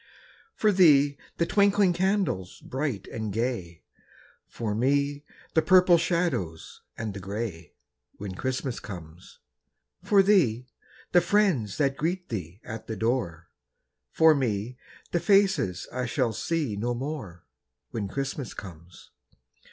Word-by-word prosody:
For 215 - +3
thee, 145 -7 +5 0.2
the 170 - +2
twinkling 200 0 +3
candles 185 - -1
bright 130 -7 -3
and 110 -2 -4
gay, 100 -7 -3 0.6
For 110 -3 -4
me, 140 +5 +1 0.3
the 160 - +4
purple 180 -1 +6
shadows 170 - -2 0.2
and 110 -2 -4
the 100 - -7
grey, 95 -4 -5 0.4
When 100 -2 -7
Christmas 130 +4 -3
comes. 85 -3 -10 0.7
For 200 -1 +5
thee, 140 - +3 0.5
the 175 - +6
friends 175 - +1
that 135 -2 +1
greet 180 +3 -2
thee 90 -4 -5
at 110 0 -8
the 110 - -4
door, 110 -9 -2 0.6
For 160 0 +6
me, 120 -4 -1 0.4
the 175 - +1
faces 190 - +2
I 125 0 -2
shall 125 -4 0
see 155 -9 -1
no 120 +4 -2
more, 120 - -6 0.5
When 105 -3 -3
Christmas 135 +2 -4
comes. 85 -2 -11
125 Hz, 125 wpm, -27 LUFS, 100-170 Hz, 0.7 s, purple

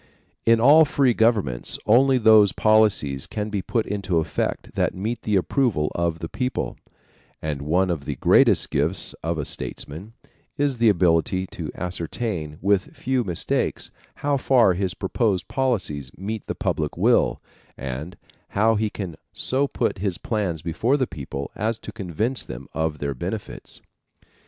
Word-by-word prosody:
In 115 0 +6
all 145 +7 +7
free 140 -4 +2
governments 105 - +1
only 130 +4 +5
those 110 -4 +6
policies 105 -11 +2
can 105 0 -4
be 100 -2 -1
put 115 +3 -1
into 100 -3 -1
effect 80 - -2
that - - 0
meet 110 +6 -3
the 105 - 0
approval 95 - +1
of 85 -1 -1
the 80 - -5
people; 125 +8 -3 0.6
and 75 -3 -3
one 90 +5 +1
of 75 -5 -4
the - - -3
greatest - - +4
gifts 80 +7 -1
of 85 +1 -2
a 75 - -2
statesman 85 +13 -6 0.4
is 140 -4 0
the 115 -1 +5
ability 90 +1 +2
to 80 -3 -6
ascertain, 90 -2 -4
with 100 -1 +1
few 130 -1 0
mistakes, 90 -6 -2 0.3
how 145 -1 +2
far 125 -7 +4
his 90 -1 -2
proposed 95 -2 0
policies 100 - -1
meet 105 +3 -5
the - - -3
public - - -2
will - - +3 0.4
and 70 +6 -6 0.4
how 110 +2 +4
he 110 0 0
can 95 -6 -6 0.2
so 135 +2 0
put 115 -7 -1
his 95 -2 -1
plans 95 -8 -2
before 100 - +1
the 130 - +1
people 70 - -6
as 110 +2 -1
to - - -9
convince 105 - -2
them - - -8
of 80 -1 -1
their 70 -1 -2
benefits. 60 - -6
100 Hz, 155 wpm, -23 LUFS, 80-115 Hz, 0.6 s, all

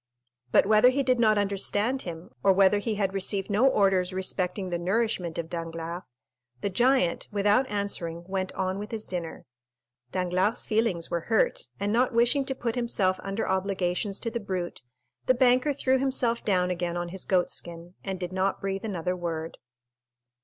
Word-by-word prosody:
But - - +5
whether 215 +4 +6
he 275 +2 0
did 255 -1 +2
not 215 -2 +4
understand 205 +5 +1
him, 170 +4 -8
or 195 - +5
whether 195 +2 +4
he 215 +1 -2
had 195 -2 0
received 195 +1 0
no 220 +7 +4
orders 195 -6 +2
respecting 185 0 -1
the 175 - -1
nourishment 185 -2 -1
of 165 - -3
Danglars, 165 +1 -5 0.6
the 200 - -1
giant, 245 -3 +2
without 205 +5 +2
answering, 180 -5 -3
went 190 -1 -2
on 190 0 -2
with 210 +1 -6
his 220 -2 -3
dinner. 175 -3 -5 0.7
Danglars' 185 +5 0
feelings 215 -7 0
were 170 -1 -2
hurt, 220 - +1
and 205 +1 0
not 245 +1 +2
wishing 240 +4 +3
to 265 - -3
put 235 -2 -2
himself 210 -6 +1
under 195 +2 -3
obligations 190 +1 -1
to 230 - -2
the 235 - -2
brute, 185 -6 -4 0.5
the 255 - +5
banker 255 +3 +4
threw 265 -1 +1
himself 255 -3 +1
down 180 -3 +1
again 175 -1 -2
on 175 0 -3
his 190 +1 -5
goat 180 -2 +1
skin 170 +1 -5
and 190 -2 -4
did 180 0 -5
not 190 +1 0
breathe 195 0 -3
another 180 -3 -2
word. 165 -2 -5
195 Hz, 175 wpm, -27 LUFS, 180-225 Hz, 0.7 s, whether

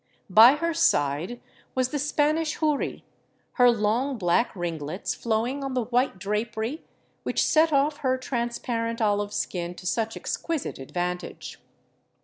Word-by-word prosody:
By 225 +6 +9
her 335 +3 -1
side 175 - +1 0.4
was 255 -1 +1
the 290 - -2
Spanish 300 +2 +1
houri, 305 -3 -1 0.5
her 245 -1 +5
long 235 +4 +1
black 190 +5 +2
ringlets 170 0 -3
flowing 235 +5 -1
on 270 -1 -3
the 250 - +1
white 245 -1 0
drapery 220 - -3 0.4
which - - 0
set 320 +1 +4
off 290 +1 +2
her 260 -3 0
transparent 235 -2 -2
olive 205 -2 +1
skin 175 -3 -3
to 180 - -12
such 225 +4 -1
exquisite 330 - -3
advantage. 180 +6 -5
235 Hz, 130 wpm, -26 LUFS, 205-275 Hz, 0.5 s, By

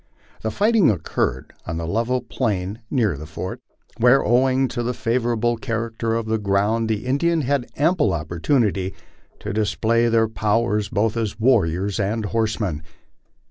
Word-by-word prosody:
The 110 - -1
fighting 210 - +3
occurred 90 -8 -2
on 80 - -3
the 85 - -3
level 115 +8 0
plain 105 -4 -2
near 110 - +1
the 75 +2 -8
fort, 85 +3 -6 0.4
where, 125 +3 +5
owing 130 +2 +3
to 120 - -3
the 120 +1 -2
favorable 120 0 0
character 115 -1 -2
of 115 -1 -1
the 110 0 0
ground, 105 +3 +1
the 110 +1 -1
Indians 155 +4 +1
had 135 -2 0
ample 160 +2 +2
opportunity 95 - 0 0.5
to - - -4
display 110 +2 +1
their 115 -1 +3
powers 105 -1 0
both 110 0 0
as 110 -2 -2
warriors 100 -5 +2
and 105 +2 -1
horsemen. 110 -7 -1
115 Hz, 145 wpm, -22 LUFS, 100-120 Hz, 0.5 s, where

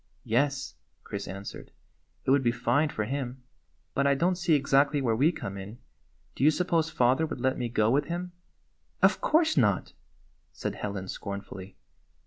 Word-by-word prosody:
"Yes," 135 - 0 0.3
Chris 100 0 -5
answered, 100 +1 -8 0.6
"it - - +2
would 140 0 +5
be 120 -2 +2
fine 145 +5 +1
for 110 -6 -2
him; 130 0 -4 0.5
but 140 0 +2
I 140 - +4
don't 175 +6 +2
see 175 -3 +2
exactly 140 +1 +3
where 120 -5 +1
we 145 +8 +4
come 100 - -6
in. 100 +4 -8 0.6
Do - - -3
you 150 - +8
suppose 165 0 +1
father 130 +4 +2
would 135 - -6
let 130 +1 +1
me 120 -1 -2
go 110 -1 +2
with 145 +3 +2
him?" 175 +2 -4 0.4
" - - -27
Of - - +4
course 320 - +3
not," 105 -8 +2 0.6
said - - -4
Helen 100 -2 -5
scornfully. 100 -1 -7
130 Hz, 170 wpm, -28 LUFS, 110-150 Hz, 0.6 s, you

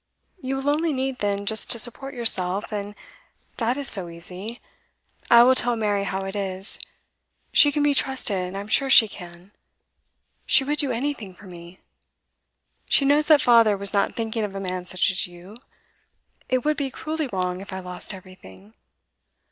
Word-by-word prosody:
You 265 0 -3
will 270 +1 -4
only 310 +2 +1
need, 265 -1 -3
then, 200 0 -2
just 220 +1 +4
to - - +2
support 250 +4 -3
yourself, 200 -5 +1
and 205 0 -5 0.6
that 240 +2 -1
is 285 -1 +3
so 185 -4 +6
easy. 180 +7 -6 0.7
I 235 0 +8
will 255 +2 +5
tell 245 -2 +1
Mary 205 -3 -1
how 190 0 -4
it 195 +1 -6
is. 195 -1 -2 0.7
She 290 - +6
can 290 +1 -1
be 290 -1 +3
trusted, 200 -10 -1
I - - -4
am 200 - -8
sure 270 +5 +2
she 235 -4 +7
can. 175 -1 -12 1.0
She 270 - +4
would 295 +2 -2
do 280 -3 +2
anything 235 -6 -4
for 210 - -16
me. 175 0 -13 1.1
She 275 - +3
knows 295 +2 +3
that 305 -3 +5
father 230 -4 +4
was 200 0 -2
not 200 - 0
thinking 225 -1 -3
of 200 -2 -5
a - - -4
man 185 -1 -5
such 185 +1 +1
as 185 - -1
you. 175 +4 -14 0.9
It 255 +1 -1
would 305 -1 +1
be 280 -2 -2
cruelly 310 +1 -5
wrong 180 -1 -3
if 200 - -11
I 190 - -5
lost 180 +1 -6
everything. 185 +2 -14
210 Hz, 180 wpm, -23 LUFS, 190-265 Hz, 1.1 s, I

